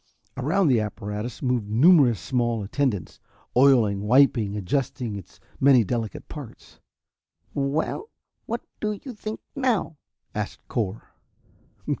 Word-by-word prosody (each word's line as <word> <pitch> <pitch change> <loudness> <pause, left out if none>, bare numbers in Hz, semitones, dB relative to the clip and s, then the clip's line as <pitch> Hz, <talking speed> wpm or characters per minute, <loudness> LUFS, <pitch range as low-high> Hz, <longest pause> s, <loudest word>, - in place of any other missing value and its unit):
Around 160 +9 +1
the 125 -4 +4
apparatus 105 +3 -4
moved 125 -5 0
numerous 130 - +5
small 120 - 0
attendants, 110 - -2 0.4
oiling, 120 -7 +5
wiping, 110 -2 +3
adjusting 115 +2 -2
its 100 -4 -10 0.2
many 135 -3 +6
delicate 115 +1 -3
parts. 145 -7 -11 0.7
"Well, 150 - -1 0.4
what 235 +1 -2 0.2
do 210 0 -1
you 260 - -7
think 215 0 -6
now?" 245 - 0 0.4
asked - - -5
Cor. 110 -2 -3
125 Hz, 110 wpm, -25 LUFS, 105-145 Hz, 0.7 s, many